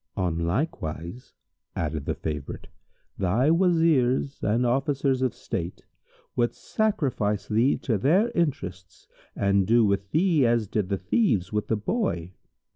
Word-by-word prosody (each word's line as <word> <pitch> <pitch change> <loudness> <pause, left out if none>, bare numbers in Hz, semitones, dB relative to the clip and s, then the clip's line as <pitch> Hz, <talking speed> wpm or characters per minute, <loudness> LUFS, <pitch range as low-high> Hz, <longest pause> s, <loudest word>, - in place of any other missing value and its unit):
"On 85 -3 0
like 95 - -1
wise," 85 +9 -6 0.4
added 75 -3 -3
the - - -1
favourite, 75 -3 -5 0.5
"thy 110 - +2
Wazirs 160 -7 +2
and 115 +4 +1
Officers 135 +1 +1
of 130 -3 0
state 85 0 -5 0.5
would 120 -1 +1
sacrifice 140 - -1
thee 115 +6 +2
to 110 -6 -1
their 190 - +3
interests 95 - -3 0.3
and 100 -1 +2
do 115 0 +5
with 100 -1 0
thee 165 - +3
as 115 -3 +2
did 100 -1 -2
the 100 - 0
Thieves 100 - 0
with 105 0 -1
the 110 - 0
Boy." 105 - -2
115 Hz, 135 wpm, -26 LUFS, 95-145 Hz, 0.5 s, do